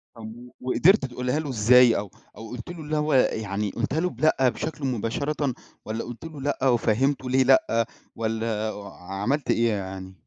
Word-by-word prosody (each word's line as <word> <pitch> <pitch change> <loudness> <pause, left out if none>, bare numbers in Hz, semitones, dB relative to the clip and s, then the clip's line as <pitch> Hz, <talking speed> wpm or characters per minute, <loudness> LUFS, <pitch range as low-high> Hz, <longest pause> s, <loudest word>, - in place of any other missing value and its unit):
طب 115 - -10
و 125 +1 -12
وقدرت 155 +7 +4
تقولها 125 +3 -2
له 150 -3 -4
إزاي 120 +1 +5
أو 100 -1 -5 0.3
أو 110 -1 -9
قُلت 125 +4 -8
له 175 -1 -7
إن 150 +1 -6
هو 150 -1 +1
يعني 105 -5 +1
قُلتها 135 +6 -2
له 180 +1 +1
بلأ 145 -6 +2
بشكل 155 +2 -5
مباشرةً، 130 +4 -1 0.3
والّا 110 +1 -3
قُلت 120 +6 -9
له 155 -4 -8
لأ 135 -1 0
وفهّمته 125 +3 +1
ليه 130 +1 +4
لأ، 120 -3 +3 0.3
والّا 110 -1 -2 0.3
عملت 100 +11 -2
إيه 115 0 +2
يعني؟ 95 -2 -5
125 Hz, 170 wpm, -25 LUFS, 110-140 Hz, 0.3 s, إزاي